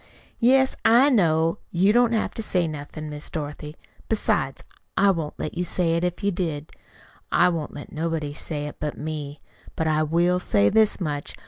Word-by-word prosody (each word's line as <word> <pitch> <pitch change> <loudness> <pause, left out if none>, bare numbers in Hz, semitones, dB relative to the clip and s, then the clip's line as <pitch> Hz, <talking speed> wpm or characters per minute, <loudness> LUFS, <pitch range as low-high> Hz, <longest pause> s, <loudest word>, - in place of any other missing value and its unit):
"Yes, 265 +2 +4
I 245 +6 +6
know. 165 -7 +2
You 190 +4 +3
don't 240 0 +4
have 220 - 0
to - - -4
say 180 -5 0
nothin', 155 0 -7
Miss 150 0 -6
Dorothy. 150 0 -6 0.3
Besides, 135 -11 0 0.3
I 195 0 +5
wouldn't 160 -5 -4
let 155 - -4
you 175 - -1
say 170 -1 0
it 170 - 0
if 180 +2 -2
you 200 - +2
did. 160 -5 -3 0.6
I - - +5
won't 165 -4 -4
let 145 - -9
nobody 160 -2 -2
say 150 -1 -4
it 150 - -7
but 150 -1 -4
me. 150 -2 -5 0.3
But 160 - -1
I 155 -1 +2
will 170 +3 +2
say 100 - +2
this 220 -1 +3
much. 150 -5 -4
165 Hz, 185 wpm, -24 LUFS, 150-190 Hz, 0.6 s, I